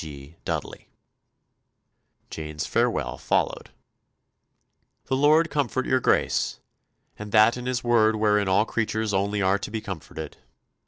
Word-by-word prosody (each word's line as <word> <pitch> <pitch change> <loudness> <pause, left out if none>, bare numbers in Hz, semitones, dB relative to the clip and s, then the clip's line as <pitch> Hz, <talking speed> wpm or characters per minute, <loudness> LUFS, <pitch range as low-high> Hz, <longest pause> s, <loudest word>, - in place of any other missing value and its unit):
G. 70 0 -10
DUDDELEY." - - -5 1.4
Jane's 75 -1 -5
farewell - - 0
followed: - - -1 1.4
"The 130 - -1
Lord 155 +4 +4
comfort 140 -3 -1
your 130 - +2
Grace, - - +1 0.6
and 105 0 -7
that 110 +2 +5
in 125 0 -6
His 125 -2 -1
word 110 -2 +3
wherein 105 -2 +2
all 95 +3 +3
creatures 110 -2 -2
only 100 +1 0
are 95 +2 +2
to 100 - -6
be 110 +1 -3
comforted. 95 -7 -8
110 Hz, 125 wpm, -25 LUFS, 100-120 Hz, 1.4 s, that